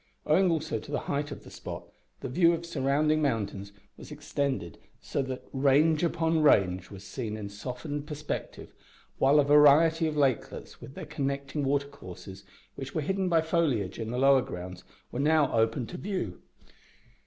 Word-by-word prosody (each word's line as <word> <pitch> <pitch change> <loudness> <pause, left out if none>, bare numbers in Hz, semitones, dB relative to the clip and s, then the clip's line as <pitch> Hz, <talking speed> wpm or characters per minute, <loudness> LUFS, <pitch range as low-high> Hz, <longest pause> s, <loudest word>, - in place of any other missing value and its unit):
Owing 180 +5 +4
also 155 -8 -1
to 110 - -11
the 150 - -1
height 145 +1 -2
of 140 - -8
the - - -13
spot, - - -7 0.4
the - - -4
view 170 +6 +4
of 170 0 -4
surrounding 150 0 +1
mountains 105 -7 -2 0.3
was - - -12
extended, 140 - -3 0.2
so - - -2
that 130 -1 -5
range 145 +4 +3
upon 165 -1 +1
range 95 - +3
was 100 -2 -10
seen 110 +1 -5
in 100 -2 -6
softened 135 +8 -6
perspective, 150 -1 -6 0.5
while 140 +3 +5
a - - +5
variety 150 +3 +5
of 155 -1 -3
lakelets, 135 -5 -1
with 135 - -11
their - - -7
connecting 140 -1 -3
watercourses, 120 -9 -4 0.3
which 135 0 -8
were 155 - +1
hidden 190 +4 -1
by 165 -2 +4
foliage 155 - 0
in 110 -1 -4
the 120 - -3
lower 135 0 +5
grounds, 90 -3 -7 0.3
were 120 - -4
now 150 0 +3
opened 115 +1 +1
up - - -10
to 180 - -7
view. 185 - -4
140 Hz, 170 wpm, -28 LUFS, 120-155 Hz, 0.5 s, while